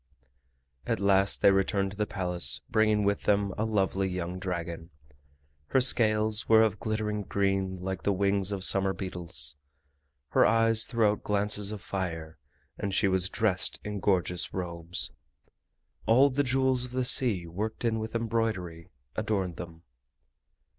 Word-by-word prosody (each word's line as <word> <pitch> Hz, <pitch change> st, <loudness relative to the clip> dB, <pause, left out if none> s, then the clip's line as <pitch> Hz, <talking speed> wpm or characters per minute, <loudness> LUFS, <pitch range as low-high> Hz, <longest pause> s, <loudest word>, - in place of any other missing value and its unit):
At 115 Hz, -, -1 dB
last 100 Hz, 0 st, +1 dB
they -, -, +7 dB
returned 95 Hz, 0 st, 0 dB
to 100 Hz, -, -12 dB
the 105 Hz, -1 st, -1 dB
Palace 90 Hz, -8 st, 0 dB
bringing 110 Hz, -1 st, +2 dB
with 100 Hz, 0 st, -1 dB
them 100 Hz, -1 st, +1 dB
a 110 Hz, -, -2 dB
lovely 95 Hz, -3 st, 0 dB
young 90 Hz, 0 st, -5 dB
dragon. 85 Hz, -3 st, -5 dB, 0.8 s
Her 130 Hz, -, +2 dB
scales 110 Hz, -4 st, +5 dB
were 110 Hz, 0 st, +6 dB
of 105 Hz, -2 st, -1 dB
glittering 110 Hz, -1 st, -3 dB
green 95 Hz, -1 st, -1 dB
like 95 Hz, 0 st, -5 dB
the 100 Hz, -, 0 dB
wings 100 Hz, 0 st, 0 dB
of 100 Hz, -2 st, -2 dB
summer 95 Hz, 0 st, +3 dB
beetles, 85 Hz, -7 st, -4 dB, 0.7 s
her -, -, +3 dB
eyes 115 Hz, +1 st, +3 dB
threw 115 Hz, -3 st, 0 dB
out 105 Hz, -, -5 dB
glances 105 Hz, 0 st, +1 dB
of 105 Hz, -3 st, -8 dB
fire, 80 Hz, -5 st, -5 dB, 0.4 s
and 100 Hz, -1 st, -3 dB
she 100 Hz, -, +2 dB
was 95 Hz, -1 st, +1 dB
dressed 95 Hz, -5 st, -1 dB
in 105 Hz, -1 st, -5 dB
gorgeous 90 Hz, -3 st, 0 dB
robes. 85 Hz, -1 st, -2 dB, 1.0 s
All 130 Hz, +5 st, +5 dB
the 140 Hz, +3 st, 0 dB
jewels 130 Hz, -1 st, +1 dB
of 125 Hz, -, -11 dB
the 130 Hz, -1 st, -1 dB
sea 110 Hz, -9 st, +4 dB
worked 105 Hz, +8 st, -5 dB
in 115 Hz, -1 st, 0 dB
with 110 Hz, +1 st, -6 dB
embroidery 110 Hz, -8 st, -3 dB, 0.3 s
adorned 95 Hz, -6 st, -2 dB
them. 85 Hz, -2 st, -10 dB
100 Hz, 150 wpm, -28 LUFS, 90-110 Hz, 1.0 s, they